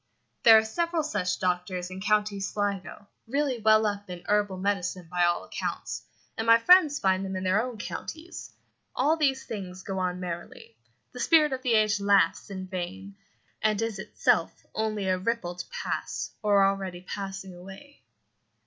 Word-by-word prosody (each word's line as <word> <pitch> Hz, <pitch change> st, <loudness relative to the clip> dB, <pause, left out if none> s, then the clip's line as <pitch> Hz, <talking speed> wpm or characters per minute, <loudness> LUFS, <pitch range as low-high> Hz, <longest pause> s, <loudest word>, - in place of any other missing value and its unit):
There 225 Hz, -1 st, +9 dB
are 220 Hz, -, +3 dB
several 335 Hz, +7 st, -1 dB
such 180 Hz, -12 st, -1 dB
doctors 180 Hz, 0 st, -2 dB
in 185 Hz, +1 st, -7 dB
County 210 Hz, 0 st, +1 dB
Sligo, 200 Hz, -1 st, -3 dB, 0.2 s
really 275 Hz, 0 st, 0 dB
well 215 Hz, 0 st, +5 dB
up 205 Hz, -1 st, -3 dB
in 180 Hz, -1 st, -7 dB
herbal 205 Hz, -2 st, +1 dB
medicine 185 Hz, -2 st, -2 dB
by 180 Hz, -1 st, +3 dB
all 175 Hz, 0 st, +1 dB
accounts, -, -, -5 dB, 0.3 s
and 225 Hz, -, -3 dB
my 230 Hz, 0 st, +8 dB
friends 305 Hz, +3 st, +6 dB
find 190 Hz, -5 st, +1 dB
them 190 Hz, -1 st, -4 dB
in 185 Hz, -, -3 dB
their 190 Hz, +3 st, +3 dB
own 245 Hz, -1 st, -5 dB
counties. 320 Hz, +10 st, -7 dB, 0.4 s
All 290 Hz, +5 st, +3 dB
these 275 Hz, -4 st, +1 dB
things 185 Hz, -5 st, -7 dB
go 190 Hz, -1 st, -3 dB
on 180 Hz, -1 st, -1 dB
merrily. 180 Hz, -, -7 dB, 0.4 s
The -, -, -9 dB
spirit 305 Hz, -4 st, +4 dB
of 260 Hz, -, -3 dB
the 250 Hz, -3 st, +2 dB
age 215 Hz, -1 st, +3 dB
laughs 200 Hz, 0 st, +2 dB
in 190 Hz, -1 st, -6 dB
vain, 190 Hz, +2 st, -6 dB, 0.5 s
and 215 Hz, -1 st, +2 dB
is 225 Hz, -3 st, -2 dB
itself 190 Hz, -, 0 dB
only 215 Hz, -3 st, -1 dB
a 185 Hz, -1 st, +1 dB
ripple 195 Hz, -3 st, -2 dB
to 180 Hz, -, -7 dB
pass, 485 Hz, -1 st, -4 dB
or 205 Hz, -2 st, +4 dB
already 195 Hz, -2 st, -2 dB
passing, 195 Hz, 0 st, -6 dB
away. 195 Hz, -, -13 dB
200 Hz, 165 wpm, -27 LUFS, 185-230 Hz, 0.5 s, There